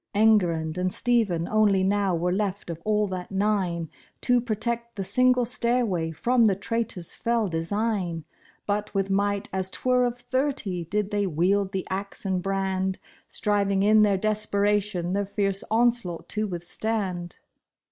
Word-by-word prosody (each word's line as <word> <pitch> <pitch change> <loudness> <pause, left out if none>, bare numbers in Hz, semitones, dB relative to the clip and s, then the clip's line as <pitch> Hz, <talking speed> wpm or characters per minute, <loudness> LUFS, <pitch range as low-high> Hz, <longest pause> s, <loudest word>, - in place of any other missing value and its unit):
Enguerrand 180 -7 +3
and 185 0 0
Stephen 200 -8 +1
only 210 -3 +3
now 195 -1 +1
were 175 +2 0
left 200 -2 -2
of 165 0 -7
all 210 0 +2
that 185 -2 -5
nine, 190 -4 0 0.3
To 245 -1 +3
protect 235 +1 -2
the 195 - -3
single 250 +5 +3
stairway 235 -8 0
from 235 +9 +2
the 200 -3 +4
traitor's 200 -3 -3
fell 230 -2 0
design; 175 -1 -2 0.4
But 210 0 -2
with 195 0 0
might 200 0 0
as 190 -1 -2
'twere 250 +4 +1
of 240 0 -2
thirty, 245 - -2
did 205 +4 -1
they 205 -1 0
wield 190 +4 +1
the 190 -2 -3
axe 195 +1 -5
and 190 -2 0
brand. 190 0 -1 0.3
Striving 200 -2 +1
in 215 +1 +5
their 205 -2 +4
desperation 205 -3 0
the 200 +1 +1
fierce 195 -1 -1
onslaught 230 -6 +1
to 215 0 0
withstand. 180 0 -3
200 Hz, 145 wpm, -26 LUFS, 185-220 Hz, 0.4 s, in